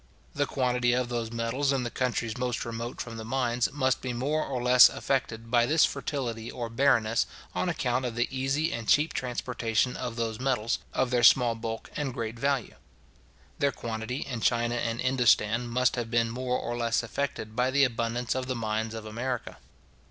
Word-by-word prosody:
The 145 0 0
quantity 125 -2 +1
of 125 -1 0
those 120 -2 -3
metals 120 +5 0
in 135 -2 0
the 120 - -3
countries 120 -3 -1
most 125 -1 -2
remote 115 +1 -5
from 115 -1 -5
the 110 - -6
mines, 120 0 0
must 130 -2 0
be 130 -1 -3
more 145 +6 0
or 130 -2 -3
less 125 0 +8
affected 115 -4 -2
by 120 -1 +4
this 160 +3 +5
fertility 120 -5 -3
or 120 -2 -5
barrenness, 115 - +2 0.3
on - - 0
account 125 +1 0
of 120 -2 -3
the 120 0 +1
easy 135 +5 0
and 115 -2 -5
cheap 150 +2 +4
transportation 125 -2 -1
of 120 -2 -4
those 115 -1 -2
metals, 125 -4 0
of 130 -1 0
their 125 -1 +2
small 120 0 +6
bulk 115 0 -6
and 140 -4 -3
great 115 -2 -4
value. 140 -1 -1 0.8
Their 140 0 +3
quantity 115 +2 -4
in 125 -4 -4
China 120 0 +2
and 120 -1 -2
Indostan 120 -3 +3
must 125 +1 +2
have 120 -2 -2
been 115 0 +1
more 125 +1 -1
or 120 - -4
less 115 0 0
affected 110 -2 -4
by 125 +2 +2
the 140 +1 +3
abundance 120 -1 0
of 130 -1 -3
the 130 - -2
mines 110 0 -2
of 110 -1 -7
America. 120 +3 -4
120 Hz, 190 wpm, -28 LUFS, 115-130 Hz, 0.8 s, less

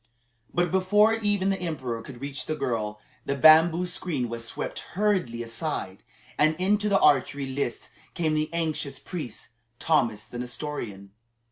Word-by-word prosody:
But 175 -1 +1
before 205 +4 +4
even 205 -3 +1
the 195 - -1
emperor 130 -9 -3
could 120 +1 -11
reach 140 0 -3
the 155 - -1
girl, 105 -6 -2 0.2
the 140 - -1
bamboo 160 +5 +6
screen 165 -8 -2
was 115 0 -4
swept 115 - -3 0.2
hurriedly 185 - +1
aside, 115 - -4 0.4
and 155 +1 +4
into 205 +4 +1
the 195 -1 +4
archery 140 0 +3
lists 130 -3 -3 0.3
came 160 -3 0
the 155 0 0
anxious 155 -5 -2
priest, 135 - -7 0.3
Thomas 120 -10 +1
the 120 - -8
Nestorian. 120 -6 -5
150 Hz, 145 wpm, -26 LUFS, 120-180 Hz, 0.4 s, bamboo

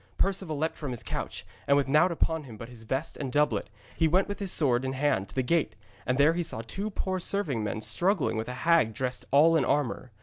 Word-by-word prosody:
Perceval 190 -5 -1
leapt 160 +3 -2
from 145 - -5
his 120 -3 -5
couch, - - -5 0.2
and 140 - +5
with 140 - +1
naught 155 +6 +4
upon 160 -2 -1
him 115 -4 -10
but 115 +2 -9
his 115 -2 -12
vest 135 +7 -2
and 135 -4 -4
doublet, 145 -7 +1 0.3
he 165 - +3
went 185 +5 +2
with 205 - -5
his 195 -3 -2
sword 130 -5 +2
in 130 0 -2
hand 130 -8 0
to - - -14
the 130 - +1
gate, 140 -5 0 0.3
and 125 +1 +1
there 145 +3 +5
he 175 - -1
saw 135 -9 -3
two 195 - -4
poor 190 -2 -2
serving 165 - 0
men 105 +1 -3
struggling 185 - +1
with 110 +1 -3
a 125 - -5
hag 160 -10 +4
dressed 125 +1 -3
all 155 +4 +6
in 155 - +3
armour. 130 -3 -1
145 Hz, 240 wpm, -28 LUFS, 125-170 Hz, 0.3 s, all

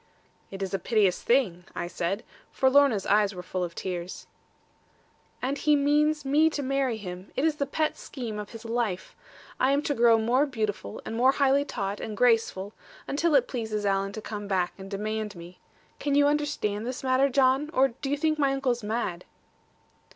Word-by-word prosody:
'It 195 0 -5
is 190 - -4
a 195 - 0
piteous 205 -2 +2
thing,' 215 -9 +1
I 175 - -2
said; 175 +4 -3 0.3
for 265 0 +2
Lorna's 275 -8 +4
eyes 205 -1 +3
were 180 - -7
full 185 0 -3
of 170 -1 -5
tears. 180 -1 -5 1.2
'And 275 +3 -1
he 300 -1 +4
means 295 +1 +2
me 300 +4 +4
to 290 -2 -3
marry 270 -3 0
him. 185 -2 -8
It 275 - +1
is 310 -2 +1
the 280 - -1
pet 310 +2 0
scheme 230 -6 -6
of 210 - -6
his 230 0 -11
life. 225 -5 -2 0.4
I 260 +2 +3
am 285 +1 +1
to 290 - 0
grow 235 -2 +5
more 245 +6 +2
beautiful, 215 - -4
and 225 - -4
more 255 +3 +4
highly 280 0 +3
taught, 200 -5 -3
and 215 -2 -6
graceful; 225 -4 +2 0.3
until 305 +2 +1
it 260 -3 +4
pleases 220 -4 -3
Alan 195 0 +1
to 220 - -6
come 205 -1 -6
back, 185 -3 0
and 195 0 -10
demand 215 +1 -3
me. 175 +1 -12 0.4
Can 285 -1 0
you 285 0 +5
understand 290 -8 0
this 255 +1 -5
matter, 260 +1 +3
John? 270 +2 +3
Or 270 -3 +3
do 270 +3 -6
you 285 - 0
think 310 +1 0
my 275 -2 +3
uncle 270 -2 +1
mad?' 210 -5 -3
235 Hz, 190 wpm, -27 LUFS, 200-275 Hz, 1.2 s, grow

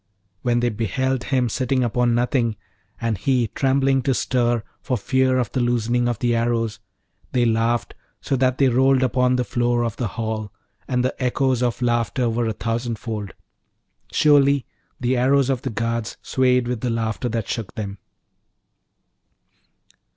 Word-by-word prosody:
When 120 -1 +1
they 120 - +2
beheld 120 +4 -1
him 130 -3 +1
sitting 130 +2 0
upon 120 0 +1
nothing, 120 -2 +1 0.4
and 115 -5 -1
he 125 0 +1
trembling 135 0 +2
to 135 -1 +1
stir 120 -3 +1 0.2
for 130 -3 -1
fear 130 +4 +2
of 120 -4 -1
the 130 - -1
loosening 120 0 +1
of 120 - -1
the 120 +1 +1
arrows, 115 -2 0 0.5
they 125 -1 +3
laughed 115 +1 +1 0.3
so 135 - -1
that 130 0 +2
they 135 - +4
rolled 130 +1 +3
upon 125 0 +2
the 125 - +1
floor 120 0 0
of 115 -2 -4
the 120 - -1
hall, 110 -2 -4 0.4
and 125 -1 0
the 130 - 0
echoes 130 0 +1
of 120 -1 -1
laughter 120 +1 +1
were 115 0 0
a 110 - -1
thousand 115 +1 -2
fold. 105 -5 -5 0.8
Surely 140 -2 +4 0.3
the 125 +1 +1
arrows 135 +2 +3
of 130 -2 -1
the 135 - -3
guards 115 +1 -2
swayed 125 -2 +2
with 120 -2 -3
the 125 - -1
laughter 115 +1 -2
that 115 -2 -2
shook 110 -5 -4
them. 100 -2 -5
120 Hz, 160 wpm, -22 LUFS, 115-130 Hz, 0.8 s, they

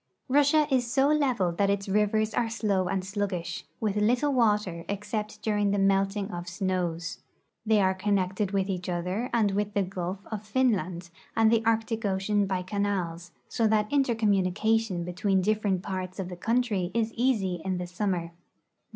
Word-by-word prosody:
Russia 290 +3 +4
is 245 -3 +1
so 270 +2 +3
level 255 -12 +2
that 195 +4 +1
its 200 0 0
rivers 210 +2 +1
are 230 0 0
slow 205 -5 0
and 185 +1 -1
sluggish, 190 -3 -3
with 210 -3 -1
little 245 +7 +2
water 210 -8 +1
except 210 +1 -4
during 205 -2 +1
the 200 - +1
melting 195 +1 +1
of 175 0 -5
snows. 180 -2 -2 0.5
They 220 -1 +4
are 190 0 +3
connected 190 0 0
Avith 195 -1 0
each 185 -2 -3
other 180 +7 -2
and 215 -4 +2
Avith 205 +1 -1
the 200 - +2
gulf 185 +1 -5
of 215 -2 -3
Finland 200 -7 0 0.3
and 225 0 +5
the 225 -1 +3
Arctic 225 0 0
ocean 200 +1 +1
by 185 -1 -1
canals, 185 -3 -2 0.2
so 225 - +1
that 215 +2 +1
inter 270 -5 +2
communication 210 -1 +1
betAveen 185 +2 0
different 205 -3 +1
parts 185 -2 -4
of 190 -2 -4
the 180 - -6
country 220 -2 0
is 225 -1 0
easy 210 -8 0
in 190 -1 -1
the 180 - -3
summer. 180 -2 -2
200 Hz, 170 wpm, -27 LUFS, 185-220 Hz, 0.5 s, and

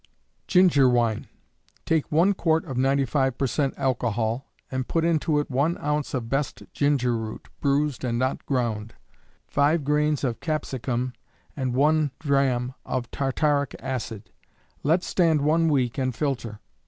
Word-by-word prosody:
Ginger 175 -8 +5
Wine. 120 -3 +1 0.6
Take 160 -2 0
one 170 +6 +4
quart 160 -3 +1
of 135 -6 -5
95 135 0 +1
per 140 - +1
cent. 135 +1 0
alcohol, 120 -1 -1 0.2
and 130 -1 -2
put 165 -1 0
into 160 -2 +2
it 145 - -3
one 145 +7 +1
ounce 150 -1 -2
of 120 -3 -3
best 135 +4 -2
ginger 135 -4 +2
root 110 -1 -6
(bruised 140 -1 0
and 120 -2 0
not 130 +2 -1
ground), 115 -5 -1 0.5
five 145 +2 +2
grains 150 0 +1
of 120 -4 -1
capsicum, 130 -5 -2 0.4
and 130 -3 -2
one 150 +2 +3
drachm 135 -4 +1
of 125 -2 -3
tartaric 140 +1 0
acid. 115 -5 -5 0.5
Let 165 +5 +2
stand 165 -5 +2
one 160 +3 +3
week 130 -4 +1
and 130 -2 -1
filter. 120 -7 -3
135 Hz, 140 wpm, -25 LUFS, 125-150 Hz, 0.6 s, Ginger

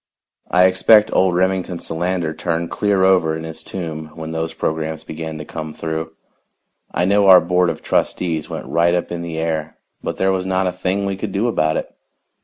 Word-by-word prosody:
I 90 0 +4
expect 105 +4 +5
old 95 -2 +3
Remington 95 -1 0
Solander 85 0 -2
turned 85 +1 -2
clear 100 -2 +1
over 90 -4 +3
in 80 - -7
his 80 0 -7
tomb 80 -4 -6
when 80 0 -6
those 80 0 -2
programs 80 0 -2
began 80 0 -6
to 75 - -7
come 80 0 -6
through. 80 0 -4 0.8
I 90 - 0
know 100 +1 +3
our 95 -1 +10
board 90 +1 +2
of - - -5
trustees 80 -4 -1
went - - -5
right 85 +1 +2
up 90 - -2
in 85 -1 -3
the 85 -1 -5
air, 80 -1 -2 0.2
but - - -4
there 95 0 +2
was 95 -1 -1
not 95 0 +1
a 90 - +1
thing 95 +2 -2
we 100 -1 -2
could 100 +1 -4
do 100 +5 0
about 80 -9 +1
it. - - -5
85 Hz, 200 wpm, -20 LUFS, 80-95 Hz, 0.8 s, our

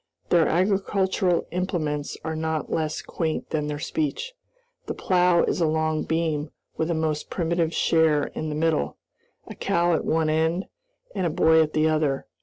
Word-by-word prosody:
Their 170 -2 +4
agricultural 190 0 +1
implements 160 -5 -2
are 160 0 -3
not 160 -1 -2
less 155 -1 -1
quaint 160 -2 -3
than 150 -1 -1
their 150 0 -3
speech. 320 - -3 0.5
The - - -3
plow 180 -2 +3
is - - 0
a 165 - +3
long 155 0 0
beam 160 -2 -1 0.3
with 160 - -1
a 170 - +1
most 155 -1 -2
primitive 170 -1 0
share 160 -3 +3
in 155 - -4
the 150 - -3
middle, 160 - 0 0.5
a - - -8
cow 170 0 +1
at 160 - 0
one 160 -1 +1
end, 160 +4 +1 0.5
and 185 -3 0
a - - 0
boy 160 -1 +4
at 155 -1 0
the 155 0 +3
other. 155 -3 0
160 Hz, 170 wpm, -25 LUFS, 155-175 Hz, 0.5 s, Their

